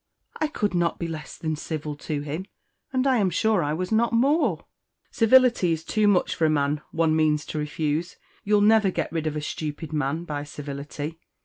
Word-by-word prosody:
"I 310 - 0
could 210 -10 -2
not 175 -1 +1
be 170 - -3
less 155 -2 -7
than 155 -1 -2
civil 150 -1 -5
to 145 0 -3
him, 155 +6 -5 0.4
and 260 0 0
I 265 -2 +4
am 200 -4 +2
sure 215 0 +2
I 145 +1 -1
was 180 +4 -3
not 225 +1 +3
more." 280 +8 +2 0.5
"Civility 235 -6 +4
is 160 0 -4
too 215 +3 +1
much 195 -3 +3
for 160 - +1
a - - +4
man 145 0 +1
one 160 -1 +1
means 155 -1 +2
to 155 - -4
refuse. 150 +3 -2 0.3
You'll 210 0 +3
never 215 -1 +5
get - - -2
rid 160 -1 -2
of 155 - -2
a 150 - -2
stupid 150 +1 -5
man 150 +2 -1
by 145 -4 -4
civility. 145 +2 -6
160 Hz, 200 wpm, -25 LUFS, 150-205 Hz, 0.5 s, never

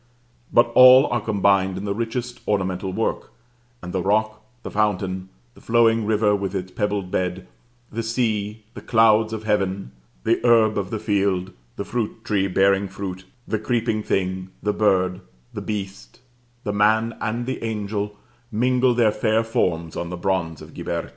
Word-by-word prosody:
But 120 0 +4
all 130 +2 +9
are 120 - 0
combined 100 -3 +2
in 100 - -5
the 100 - -1
richest 120 +2 -4
ornamental 95 -2 -1
work; 110 +4 -2 0.5
and 90 - -6
the 95 - 0
rock, 110 +3 0 0.2
the - - -6
fountain, 95 -3 -1 0.2
the - - -18
flowing 115 -2 +3
river 105 -1 +3
with 100 -1 -3
its 95 -1 -4
pebbled 100 -2 -2
bed, 90 0 -2 0.5
the 115 - -3
sea, 110 -2 -2
the - - -9
clouds 110 -1 +4
of 110 -1 -5
Heaven, 100 - -1 0.3
the 115 - +2
herb 115 -3 +4
of 100 -2 -2
the 110 - -3
field, 100 -3 0 0.2
the 100 - -5
fruit 115 -1 -4
tree 100 -2 +1
bearing 95 +1 +2
fruit, 95 -1 -6 0.2
the 110 - -1
creeping 115 -1 0
thing, 95 -2 -2
the 105 - +1
bird, 95 -3 +1 0.3
the - - -5
beast, 100 0 -6 0.4
the 105 - -2
man, 110 +3 +2
and 115 +3 -2
the 130 -2 -4
angel, 105 -2 -3 0.3
mingle 125 +2 +2
their 115 -3 +4
fair 110 +1 +1
forms 85 -7 -1
on 85 - -4
the 90 - -5
bronze 85 -4 -2
of - - -13
Ghiberti. 85 -1 -4
105 Hz, 165 wpm, -23 LUFS, 95-110 Hz, 0.5 s, all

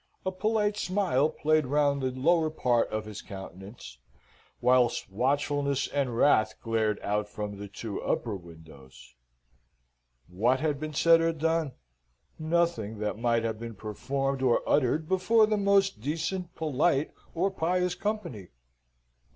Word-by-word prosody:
A 190 - 0
polite 210 +1 0
smile 180 -8 +1
played 155 -2 +1
round 145 0 +2
the 130 - 0
lower 160 +5 +2
part 125 -6 +1
of 110 0 -3
his 105 -1 -8
countenance, 95 - -10 0.6
whilst 125 -4 +2
watchfulness 140 +4 0
and 135 -5 -1
wrath 115 -5 +3
glared 110 -2 0
out 105 0 -1
from 105 -1 -5
the 100 - -6
two 105 +1 -6
upper 110 -4 -1
windows. 80 -7 -14 1.1
What 115 +9 +1
had 150 -2 -1
been 155 0 -5
said 165 +2 +5
or 165 0 +1
done? 160 -2 0 0.7
Nothing 155 -10 0
that 105 0 -3
might 115 -1 +1
not 115 - 0
have 110 -1 -6
been 115 -1 -7
performed 135 +6 -3
or 125 -3 +2
uttered 150 +3 +2
before 200 +5 +4
the 215 0 0
most 200 - +2
decent, 165 - -3
polite, 155 -1 +1 0.2
or 190 +4 +1
pious 180 0 0
company. 180 - -4
140 Hz, 140 wpm, -28 LUFS, 110-165 Hz, 1.1 s, said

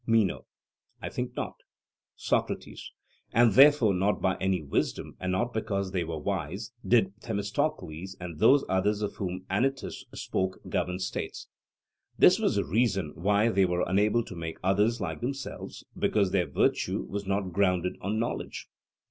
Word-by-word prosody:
MENO: 115 -4 +2 0.5
I - - -5
think 125 0 -4
not. - - -4 0.6
SOCRATES: - - -2 0.4
And 115 -2 +5
therefore 135 -5 +7
not 95 +3 +1
by 95 -1 +1
any 95 -1 +1
wisdom, 70 - -2
and 90 0 -2
not 120 +6 0
because 100 -4 -2
they 90 -2 0
were 80 -1 -4
wise, 95 +8 -3
did 100 -6 +3
Themistocles 100 - -3
and 85 -3 -7
those 140 0 +5
others 100 +3 +1
of 105 - -3
whom 95 -1 -4
Anytus 135 +8 -1
spoke 95 0 -2
govern 90 0 -1
states. 95 - -5 0.7
This - - +6
was - - +1
the - - +1
reason 95 - +1
why 105 +5 +2
they 100 -4 +3
were 90 0 0
unable 105 +4 +2
to 95 - -9
make 80 -1 -5
others 105 +5 +2
like 80 -3 -4
themselves 135 +2 -5
because 100 -4 +1
their 90 -3 +1
virtue - - +1
was 100 0 -5
not 95 -2 -1
grounded 90 -2 +1
on 105 +3 -1
knowledge. 115 +1 -3
100 Hz, 155 wpm, -28 LUFS, 90-110 Hz, 0.7 s, therefore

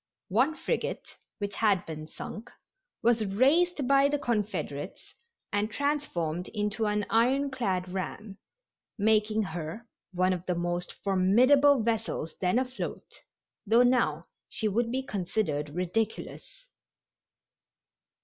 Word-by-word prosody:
One 255 +11 +2
frigate, 475 - -3 0.2
which 205 -1 -4
had 200 -4 +2
been 155 -1 -7
sunk, 215 +7 -8 0.5
was 230 -1 +3
raised 275 - +2
by 275 +1 +5
the 290 - +1
Confederates 205 - -3 0.4
and 205 +1 +1
transformed 210 - -2
into 210 +1 -1
an 210 0 0
ironclad 240 -6 +1
ram, 195 +2 -5 0.6
making 215 0 +2
her 175 +5 -6 0.2
one 185 0 +2
of 180 -1 -4
the 180 - +1
most 175 +1 -2
formidable 245 +8 +5
vessels 225 -8 -2
then 180 +4 +2
afloat, 255 0 -4 0.5
though 230 +4 +6
now 205 -11 +2 0.2
she 220 - -2
would 230 +3 0
be 265 +1 -1
considered 180 - -2
ridiculous. 220 - -3
215 Hz, 110 wpm, -29 LUFS, 185-250 Hz, 0.6 s, though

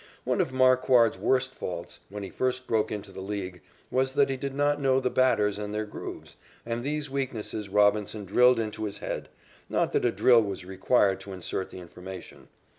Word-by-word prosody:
One - - +1
of - - -1
Marquard's 130 -4 +4
worst 130 +5 +1
faults, 85 -1 -6
when 100 +1 -6
he 95 - -7
first 130 0 -1
broke 110 -2 0
into 105 -2 -5
the 95 - -8
League, 95 -3 -5 0.3
was 130 +1 +1
that 140 -1 +3
he - - -1
did 135 +1 -5
not 145 +1 +1
know 135 -1 +3
the 130 -1 -1
batters 105 -6 +2
and 105 0 -4
their 110 0 -1
grooves, 105 - -8 0.3
and 115 0 -3
these 145 0 -2
weaknesses 115 -6 -3
Robinson 105 +1 +2
drilled 125 +5 +5
into 110 -1 -3
his 100 - -5
head - - -5 0.4
not - - +1
that - - +1
a 120 - +3
drill 120 0 +5
was 100 -3 -4
required 95 +1 +2
to 100 - -9
insert 95 +1 -4
the - - -10
information. 90 +1 -10
110 Hz, 190 wpm, -27 LUFS, 100-130 Hz, 0.4 s, drilled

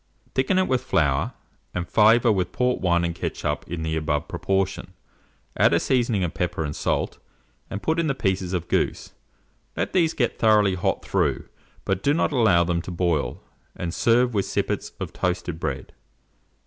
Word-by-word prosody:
Thicken 135 +8 +1
it 185 - +3
with 130 -1 +1
flour, 70 -4 +1 0.4
and 90 0 -2
flavour 115 +2 +5
with 90 -3 0
port 125 0 0
wine 85 -2 +2
and 85 - -2
ketchup, - - -3
in 80 -1 -4
the 80 0 -1
above 75 -2 -1
proportion; 95 -1 -2 0.6
add - - +4
a - - +3
seasoning 120 -6 +1
of 85 - -2
pepper 90 -2 -2
and 75 -1 -4
salt, - - -1 0.5
and 100 - -5
put 160 +1 +1
in 165 - +1
the 135 - 0
pieces 95 -6 -1
of 90 -2 -2
goose; - - -1 0.7
let - - -2
these 165 -4 +2
get 120 -4 0
thoroughly 105 -3 +4
hot 90 - -1
through, - - 0 0.4
but 95 -1 0
do 145 +7 +2
not 165 - +1
allow 110 -10 +4
them 85 0 0
to 90 - -9
boil, 85 -4 -1 0.3
and 85 -1 -4
serve 120 +1 +3
with 100 -2 +1
sippets - - -2
of - - -5
toasted 90 -2 -2
bread. - - -4
95 Hz, 175 wpm, -24 LUFS, 85-120 Hz, 0.7 s, flavour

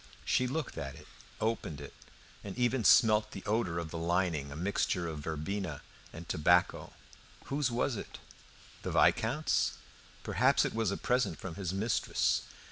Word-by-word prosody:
She 125 - +2
looked 150 +3 -3
at 70 -1 -5
it, - - -13 0.3
opened 110 -9 -2
it, 70 - -9 0.5
and 100 +2 -7
even 120 0 +1
smelt 105 0 +5
the 95 - -8
odour 105 -5 0
of 85 -2 -4
the 85 - -4
lining 85 -4 0
a - - -7
mixture 90 0 0
of 80 -2 -5
verbena 80 +2 -4 0.3
and 85 +2 -9
tobacco. 85 +3 +2 0.5
Whose 140 -2 0
was 120 0 0
it? - - -7 0.6
The - - -4
Viscount's? 135 +8 +2 0.5
Perhaps - - +3
it - - -2
was 110 -2 0
a 100 - -2
present 125 -9 0
from 95 - -6
his 95 -1 -3
mistress. 105 +4 +1
95 Hz, 155 wpm, -32 LUFS, 80-115 Hz, 0.6 s, smelt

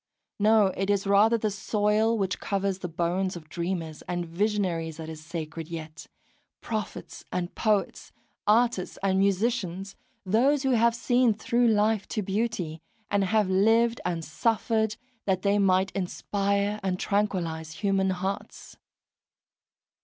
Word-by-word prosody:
No, 210 -2 +4
it 195 +1 -2
is 200 -1 +1
rather 205 +4 +5
the 215 -1 -1
soil 210 +3 +1
which 190 -3 -1
covers 195 -1 -1
the 180 - -4
bones 175 +3 -1
of 155 -3 -10
dreamers 170 -2 -4
and 175 -1 -2
visionaries 170 -3 -1
that 160 -1 -7
is 155 -1 -8
sacred 165 0 -6
yet, 160 -1 -8 0.5
prophets 215 -3 -5
and 175 -1 -3
poets, 210 -3 0 0.4
artists 225 -3 +2
and 190 -1 +2
musicians, 195 -1 0 0.3
those 260 +9 +3
who 265 - +2
have 235 -1 +3
seen 245 -1 +2
through 235 +2 +1
life 215 -1 +2
to 215 - -2
beauty, 190 -6 -2 0.3
and 200 -1 +2
have 210 +1 +2
lived 225 +5 +3
and 170 -2 -2
suffered 220 +3 0 0.3
that 185 -2 0
they 200 0 +3
might 190 -1 +3
inspire 200 +2 -1
and 190 -2 -1
tranquillise 170 -6 -1
human 195 +1 +1
hearts. 190 +1 -4
195 Hz, 135 wpm, -27 LUFS, 180-215 Hz, 0.5 s, rather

